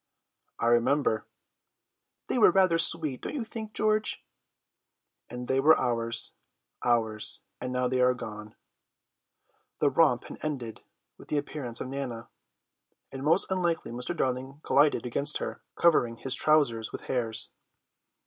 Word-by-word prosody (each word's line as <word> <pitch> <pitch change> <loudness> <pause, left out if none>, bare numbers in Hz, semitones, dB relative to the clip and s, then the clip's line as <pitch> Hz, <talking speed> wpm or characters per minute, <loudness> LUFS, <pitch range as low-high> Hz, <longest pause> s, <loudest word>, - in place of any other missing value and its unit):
'" - - -50
"I - - -1
remember!" 120 -1 +2 1.0
"They 250 - -1
were 220 - +8
rather 185 -2 +3
sweet, 155 -5 +1
don't - - -5
you 265 - -2
think, 220 -1 -7
George?" 215 0 0 1.0
"And 125 +1 -6
they 130 - +2
were 155 +4 +6
ours, 115 -2 +1 0.5
ours! 110 -3 0 0.2
and 125 0 -4
now 125 0 0
they 130 0 0
are 125 0 +4
gone." 105 -3 -8 1.2
The - - +2
romp - - +3
had - - -10
ended 130 -7 -4 0.4
with - - -14
the 150 - -1
appearance 140 -5 -4
of - - -4
Nana, 130 -4 -5 0.8
and 135 - -7
most 165 +6 +2
unluckily 175 -8 -1
Mr. 125 +8 -4
Darling 130 +1 -2
collided 145 -2 +3
against 140 +5 +1
her, - - -5
covering 120 -9 +3
his 130 +1 -3
trousers 135 -6 +2
with - - -6
hairs. 115 -3 0
130 Hz, 140 wpm, -28 LUFS, 120-155 Hz, 1.2 s, were